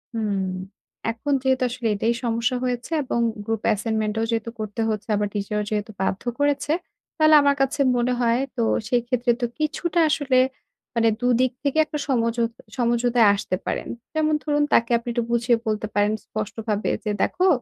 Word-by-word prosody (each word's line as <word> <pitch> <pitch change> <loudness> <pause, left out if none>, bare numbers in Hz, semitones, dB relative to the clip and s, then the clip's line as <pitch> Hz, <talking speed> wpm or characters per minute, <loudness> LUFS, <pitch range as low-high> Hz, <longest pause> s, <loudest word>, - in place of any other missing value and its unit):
হুম। 210 -3 -1 0.7
এখন 280 +5 -2
যেহেতু 260 0 +2
আসলে 245 -1 -3
এটাই 225 +3 +1
সমস্যা 235 +2 0
হয়েছে 245 +3 -2
এবং 245 - -1 0.3
গ্রূপ 225 -1 -2
এসাইনমেন্টও 220 +1 -1
যেহেতু 230 0 -1
করতে 215 +1 -3
হচ্ছে, 215 -1 -3
আবার 205 0 0
টিচারও 210 +1 -2
যেহেতু 215 +1 -2
বাধ্য 190 0 -1 0.2
করেছে, 285 +1 +1 0.4
তালে 310 0 +5
আমার 280 0 +3
কাছে 275 +2 0 0.2
মনে 245 +1 +1
হয় 235 +1 +2 0.2
তো 235 - +2 0.2
সেই 245 +1 +2
ক্ষেত্রে 245 -1 +1
তো 240 - +2
কিছুটা 310 +3 0
আসলে, 280 -4 +1 0.6
মানে 230 -1 +4
২ 245 - 0
দিক 255 -1 +3
থেকে 285 +1 0
একটা 300 - -4
সমঝো 235 -3 +1 0.3
সমঝোতায় 240 -1 +3
আসতে 195 -2 -2
পারেন। - - -2 0.3
যেমন 310 -1 +1
ধরুন 295 -1 +1
তাকে 230 +1 +4
আপনি 235 - -11
একটু 235 -1 0
বুঝিয়ে 235 0 +3
বলতে 215 0 -1
পারেন 205 +1 +3
স্পষ্টভাবে 215 0 -3
যে, 210 - -1
"দেখো 365 +1 +1
235 Hz, 165 wpm, -23 LUFS, 220-265 Hz, 0.7 s, তালে